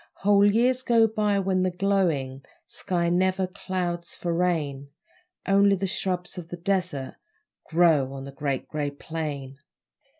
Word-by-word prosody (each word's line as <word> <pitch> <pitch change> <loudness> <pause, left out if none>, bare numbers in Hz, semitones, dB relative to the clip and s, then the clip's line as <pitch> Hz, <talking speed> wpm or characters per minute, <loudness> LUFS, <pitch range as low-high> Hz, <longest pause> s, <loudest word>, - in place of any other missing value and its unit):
Whole 200 0 +5
years 240 +5 +3
go 235 -3 +4
by 210 -2 0
when 190 -1 +1
the 185 - +2
glowing 175 -9 0 0.2
Sky 175 -3 -2
never 185 +2 +1
clouds 180 -2 -4
for 170 -1 -2
rain 155 -6 -1 0.6
Only 200 0 +4
the 195 +1 -2
shrubs 180 -1 -2
of 170 - -9
the 175 - -6
desert 175 -7 -2 0.5
Grow 160 -6 +3
on 135 -1 -7
the 140 - -8
Great 140 -1 -3
Grey 150 -2 -2
Plain. 140 -2 -6
180 Hz, 140 wpm, -26 LUFS, 150-195 Hz, 0.6 s, Whole